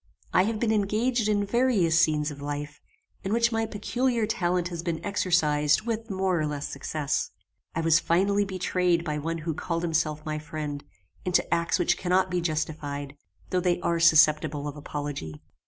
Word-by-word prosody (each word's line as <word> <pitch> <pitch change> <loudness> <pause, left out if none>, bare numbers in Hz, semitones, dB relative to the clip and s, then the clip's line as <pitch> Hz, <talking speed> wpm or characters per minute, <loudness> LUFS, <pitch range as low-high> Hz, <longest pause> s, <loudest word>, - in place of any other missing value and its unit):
I 185 - +5
have 220 0 -2
been 225 -1 +1
engaged 220 +3 +1
in 205 -1 +1
various 200 -8 +3
scenes 150 -2 +1
of 140 -1 -10
life, 145 0 -5 0.4
in 195 - -3
which 235 +1 +3
my 225 0 0
peculiar 235 +3 0
talent 175 -3 0
has 170 -2 -5
been 170 -2 -2
exercised 155 -5 +2
with 230 0 -3
more 190 -3 0
or 155 - 0
less 145 -1 -3
success. 150 -3 -2 0.5
I 165 - 0
was 165 0 +4
finally 200 +4 +2
betrayed 180 -3 0
by 150 -2 -2
one 165 +3 -3
who 165 - -1
called 170 +2 -3
himself 155 -2 -1
my 155 0 -2
friend, 150 -2 -5 0.4
into 180 -1 +1
acts 170 0 +1
which 175 - +2
cannot 185 +1 +1
be 180 -1 0
justified, 150 -3 -3 0.4
though 185 - +2
they 175 -1 +1
are 170 0 0
susceptible 155 -2 +4
of 145 - -5
apology. 145 - -5
170 Hz, 170 wpm, -27 LUFS, 150-195 Hz, 0.5 s, I